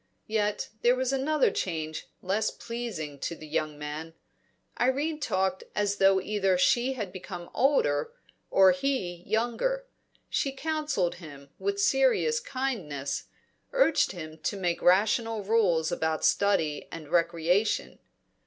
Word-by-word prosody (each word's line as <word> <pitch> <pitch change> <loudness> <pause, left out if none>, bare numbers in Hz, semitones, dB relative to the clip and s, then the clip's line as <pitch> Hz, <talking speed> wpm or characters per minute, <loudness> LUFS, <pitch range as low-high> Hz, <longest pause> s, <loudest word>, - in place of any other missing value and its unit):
Yet 210 -1 -1
there 245 +1 +4
was 260 +1 0
another 285 +2 +2
change 160 -3 -3 0.2
less 205 +4 +1
pleasing 230 -12 -6
to 170 - -3
the 155 - -11
young 150 0 -2
man; 150 +2 -6 0.6
Irene 285 +5 +1
talked 190 -8 0
as 205 -1 0
though 195 -1 +5
either 195 -1 +1
she 240 +8 +3
had 210 -8 -5
become 180 -2 -8
older, 150 - +2 0.4
or 190 -1 +6
he 265 -11 -2
younger. 240 - 0 0.4
She 275 - -1
counselled 295 - -1
him 140 -3 -11
with 400 0 -1
serious 465 +3 +3
kindness, 195 - -3 0.5
urged - - +3
him 160 -3 -8
to 200 - -2
make 175 -3 -1
rational 215 +4 +3
rules 190 -7 +2
about 160 -1 0
study 165 -8 +2
and 155 -3 -8
recreation. 170 +4 +1
195 Hz, 125 wpm, -28 LUFS, 165-260 Hz, 0.6 s, or